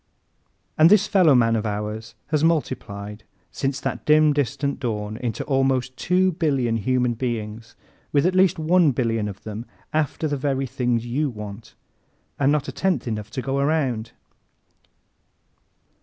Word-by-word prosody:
And 160 Hz, +2 st, +8 dB
this 205 Hz, 0 st, +5 dB
fellowman 140 Hz, -, +4 dB
of 110 Hz, -, -1 dB
ours 105 Hz, +1 st, -4 dB
has 155 Hz, -1 st, +1 dB
multiplied, 105 Hz, -10 st, -2 dB, 0.3 s
since 135 Hz, 0 st, -2 dB
that -, -, -4 dB
dim 155 Hz, 0 st, +5 dB
distant 140 Hz, 0 st, -1 dB
dawn, 105 Hz, -4 st, -3 dB
into 120 Hz, -3 st, -3 dB
almost 135 Hz, -2 st, 0 dB
two 185 Hz, +4 st, +2 dB
billion 135 Hz, -9 st, 0 dB
human 125 Hz, +2 st, +1 dB
beings, 115 Hz, -2 st, -4 dB, 0.4 s
with 145 Hz, +1 st, +3 dB
at 180 Hz, -, +2 dB
least 185 Hz, -1 st, +4 dB
one 160 Hz, -2 st, +3 dB
billion 115 Hz, -3 st, 0 dB
of 100 Hz, -1 st, -8 dB
them 110 Hz, +2 st, -6 dB, 0.3 s
after 155 Hz, +1 st, 0 dB
the 145 Hz, -1 st, -1 dB
very 135 Hz, 0 st, -1 dB
things 120 Hz, -2 st, -1 dB
you 140 Hz, +5 st, -1 dB
want, 105 Hz, -1 st, -9 dB, 0.6 s
and 140 Hz, 0 st, +3 dB
not 150 Hz, -2 st, 0 dB
a -, -, -3 dB
tenth 185 Hz, -8 st, -1 dB
enough 105 Hz, -2 st, -4 dB
to 125 Hz, +3 st, -5 dB
go 135 Hz, 0 st, -1 dB
around! 140 Hz, -7 st, 0 dB
130 Hz, 145 wpm, -23 LUFS, 115-150 Hz, 0.6 s, And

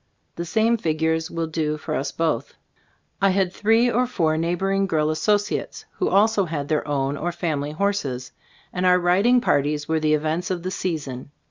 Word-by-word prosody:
The 170 Hz, -, -4 dB
same 225 Hz, +6 st, +2 dB
figures 160 Hz, -2 st, 0 dB
will 165 Hz, -1 st, -2 dB
do 155 Hz, -1 st, -2 dB
for 155 Hz, +1 st, -5 dB
us 135 Hz, -2 st, -2 dB
both. 155 Hz, -6 st, -2 dB, 0.7 s
I 195 Hz, -, +5 dB
had 190 Hz, -1 st, +1 dB
three 225 Hz, +4 st, +3 dB
or 250 Hz, +2 st, +1 dB
four 165 Hz, -10 st, 0 dB
neighboring 195 Hz, +4 st, 0 dB
girl 155 Hz, -3 st, +1 dB
associates 205 Hz, +6 st, -1 dB
who -, -, +1 dB
also 205 Hz, 0 st, +3 dB
had 150 Hz, -4 st, -4 dB
their 155 Hz, -1 st, 0 dB
own 140 Hz, -1 st, -1 dB
or 175 Hz, +4 st, -2 dB
family 150 Hz, -4 st, -2 dB
horses, 155 Hz, -9 st, -2 dB, 0.4 s
and 180 Hz, -, -2 dB
our 180 Hz, 0 st, +5 dB
riding 195 Hz, +8 st, +3 dB
parties 145 Hz, -, 0 dB
were 160 Hz, 0 st, +1 dB
the 155 Hz, 0 st, +2 dB
events 160 Hz, +4 st, -2 dB
of 180 Hz, -2 st, -3 dB
the 185 Hz, -, -3 dB
season. 145 Hz, -9 st, -4 dB
165 Hz, 175 wpm, -23 LUFS, 155-195 Hz, 0.7 s, I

